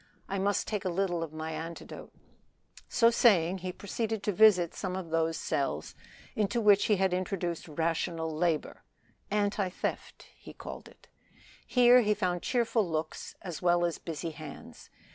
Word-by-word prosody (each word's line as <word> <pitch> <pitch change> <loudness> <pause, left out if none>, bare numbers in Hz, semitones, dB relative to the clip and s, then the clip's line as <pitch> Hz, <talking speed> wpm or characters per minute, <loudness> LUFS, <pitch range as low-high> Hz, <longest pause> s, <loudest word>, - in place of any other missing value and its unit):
I 195 - -2
must 200 +1 0
take 210 -3 -2
a 185 - -1
little 175 -1 -1
of 165 -2 -4
my 155 +1 -5
antidote." 165 +1 -7 0.8
So 230 -1 +4
saying 190 -6 +4
he 185 0 -4
proceeded 220 +2 -3
to 210 - +1
visit 190 -4 +5
some 185 -1 -4
of 180 -4 -6
those 165 0 +1
cells 80 - -2 0.4
into 215 +3 0
which 205 -2 +5
he 210 - +3
had 190 -1 +1
introduced 180 -2 -2
rational 165 +1 -1
labor 160 -1 -1 0.5
(anti 205 -1 0
theft 180 - -5
he - - -12
called - - -9
it). - - -19 0.6
Here 250 0 +6
he 210 -2 +2
found 180 -4 -1
cheerful 230 -5 +1
looks 155 0 -4
as 175 -5 -6
well 175 -1 +3
as 170 - -2
busy 165 0 -5
hands. 155 -2 -11
180 Hz, 160 wpm, -30 LUFS, 165-205 Hz, 0.8 s, Here